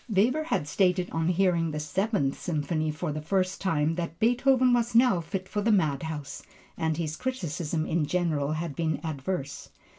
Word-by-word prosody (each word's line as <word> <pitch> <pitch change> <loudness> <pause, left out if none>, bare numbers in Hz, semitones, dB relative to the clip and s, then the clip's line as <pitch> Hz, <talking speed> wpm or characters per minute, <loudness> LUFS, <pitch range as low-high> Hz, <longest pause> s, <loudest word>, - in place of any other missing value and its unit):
Weber 240 +10 +2
had 150 - -1
stated 180 +1 +1
on 165 0 0
hearing 175 -2 +2
the 150 -1 -3
Seventh 155 -2 -1
Symphony 155 -1 -1
for 155 +1 -3
the 155 +1 -4
first 185 +3 -1
time 160 -4 +1
that 170 -2 -4
Beethoven 250 +2 +4
was 235 -1 +1
now 235 -7 +5
fit 190 +3 -5
for 205 +2 -2
the 225 +2 +2
madhouse, 155 -5 -1 0.3
and 160 -1 -1
his 155 -2 -2
criticisms 170 - -3
in 160 -2 0
general 155 -5 0
had 155 -2 -4
been 160 -1 -1
adverse. 145 -1 -4
170 Hz, 170 wpm, -27 LUFS, 155-195 Hz, 0.3 s, now